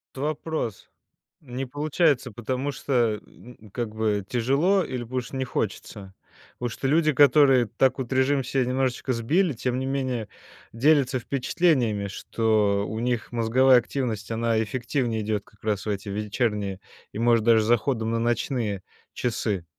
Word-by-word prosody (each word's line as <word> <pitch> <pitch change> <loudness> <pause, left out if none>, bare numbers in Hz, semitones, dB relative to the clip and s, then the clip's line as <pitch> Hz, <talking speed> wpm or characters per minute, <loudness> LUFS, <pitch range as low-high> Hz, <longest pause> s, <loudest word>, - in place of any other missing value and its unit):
Вот 135 - -6
вопрос. 150 -6 -3 0.5
Не 130 -2 -5
получается, 145 -2 +1
потому 130 +6 -3
что, 120 -6 0
м, 110 -3 -16
как 115 -3 -4
бы 105 -2 0
тяжело 140 - +2
или 130 -6 -4
потому 125 +2 -2
что 125 +2 -8
не 130 - -1
хочется? 105 -4 -4 0.5
Потому 120 - -2
что 135 - -3
люди, 155 +1 +3
которые 140 -3 +5
так 130 +5 +1
вот 130 -1 -4
режим 135 +2 +2
себе 135 0 0
немножечко 130 0 -1
сбили, 150 +10 +1
тем 125 +2 -2
не 130 - -2
менее 130 -5 -2 0.4
делятся 135 +1 +3
впечатлениями, 125 - +1
что 105 -1 0
у 110 - -4
них 120 -1 -1
мозговая 125 +3 +4
активность, 120 -5 -3
она 115 0 +1
эффективнее 120 0 -2
идет 105 -1 -2
как 105 - -25
раз 105 -2 -1
в - - -3
эти 100 0 -4
вечерние 105 -1 -2 0.3
и, - - -6
может 115 -1 +3
даже, 115 -1 +5
с - - -2
заходом 115 0 +1
на 115 - 0
ночные 115 -3 -1 0.3
часы. 105 -6 -2
120 Hz, 155 wpm, -25 LUFS, 110-135 Hz, 0.5 s, которые